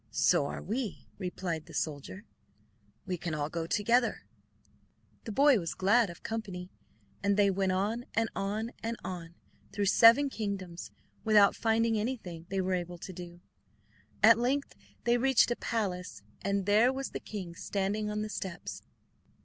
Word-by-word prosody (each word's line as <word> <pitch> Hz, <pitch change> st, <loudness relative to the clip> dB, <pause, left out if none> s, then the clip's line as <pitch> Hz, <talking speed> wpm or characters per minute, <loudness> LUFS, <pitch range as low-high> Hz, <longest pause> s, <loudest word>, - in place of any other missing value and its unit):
"So 140 Hz, -, +3 dB
are -, -, -6 dB
we," 225 Hz, +1 st, -3 dB
replied 175 Hz, -3 st, -4 dB
the 165 Hz, -, -11 dB
soldier. 155 Hz, +8 st, -4 dB, 0.8 s
"We 185 Hz, -2 st, -2 dB
can 165 Hz, -2 st, -3 dB
all 150 Hz, 0 st, -2 dB
go 165 Hz, -1 st, -3 dB
together." 235 Hz, +6 st, +2 dB, 1.0 s
The 225 Hz, -, -4 dB
boy 275 Hz, +1 st, +5 dB
was 165 Hz, -2 st, -4 dB
glad 205 Hz, +3 st, +3 dB
of 170 Hz, -, -11 dB
company 190 Hz, -5 st, -5 dB, 0.5 s
and 200 Hz, 0 st, +2 dB
they 200 Hz, -1 st, +5 dB
went 190 Hz, 0 st, +1 dB
on, 215 Hz, +6 st, -1 dB
and 225 Hz, +1 st, +2 dB
on, 215 Hz, +4 st, -2 dB
and 230 Hz, +1 st, -3 dB
on, 170 Hz, -2 st, -6 dB, 0.4 s
through 205 Hz, 0 st, -1 dB
seven 230 Hz, +7 st, +7 dB
kingdoms, 200 Hz, -8 st, -5 dB, 0.3 s
without 210 Hz, -2 st, +5 dB
finding 225 Hz, 0 st, +2 dB
anything 195 Hz, -8 st, -4 dB
they 195 Hz, 0 st, 0 dB
were 185 Hz, 0 st, -1 dB
able 175 Hz, -1 st, -3 dB
to 185 Hz, +2 st, -8 dB
do. 175 Hz, 0 st, -9 dB, 0.8 s
At 230 Hz, +1 st, +8 dB
length 270 Hz, +4 st, 0 dB, 0.3 s
they 240 Hz, 0 st, +3 dB
reached 265 Hz, -1 st, +4 dB
a -, -, +2 dB
palace, 190 Hz, -7 st, -3 dB, 0.2 s
and 200 Hz, -1 st, 0 dB
there 215 Hz, +5 st, +5 dB
was 270 Hz, 0 st, -4 dB
the -, -, -4 dB
king 190 Hz, -5 st, -7 dB
standing 200 Hz, +4 st, -2 dB
on 210 Hz, 0 st, -2 dB
the 215 Hz, -, -4 dB
steps. 190 Hz, -4 st, -5 dB
200 Hz, 155 wpm, -31 LUFS, 180-225 Hz, 1.0 s, At